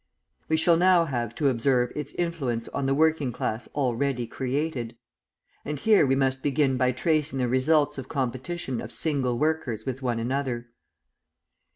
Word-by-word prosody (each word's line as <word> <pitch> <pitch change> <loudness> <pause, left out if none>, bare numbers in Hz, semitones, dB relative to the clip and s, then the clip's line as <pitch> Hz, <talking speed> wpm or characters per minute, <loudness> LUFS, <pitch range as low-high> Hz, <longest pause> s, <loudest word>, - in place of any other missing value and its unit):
We 160 - +3
shall 165 +1 +4
now 180 -1 +5
have 120 -5 -3
to 145 - +1
observe 125 -1 +2
its 150 -1 -5
influence 140 -10 -2
on 140 -1 -2
the 135 - +2
working 155 -3 +2
class 115 0 -3
already 130 -2 0
created. 130 -2 -3 0.7
And 150 -1 -4
here 210 -7 +4
we 135 - +3
must 135 -1 +1
begin 140 -1 +1
by 125 0 +2
tracing 150 +1 0
the 125 -1 +1
results 140 +4 +2
of 130 - -8
competition 130 +1 -3
of - - -8
single 135 -6 0
workers 140 -7 -1
with 130 0 -4
one 120 -3 -1
another. 120 -1 -2
135 Hz, 160 wpm, -26 LUFS, 125-150 Hz, 0.7 s, now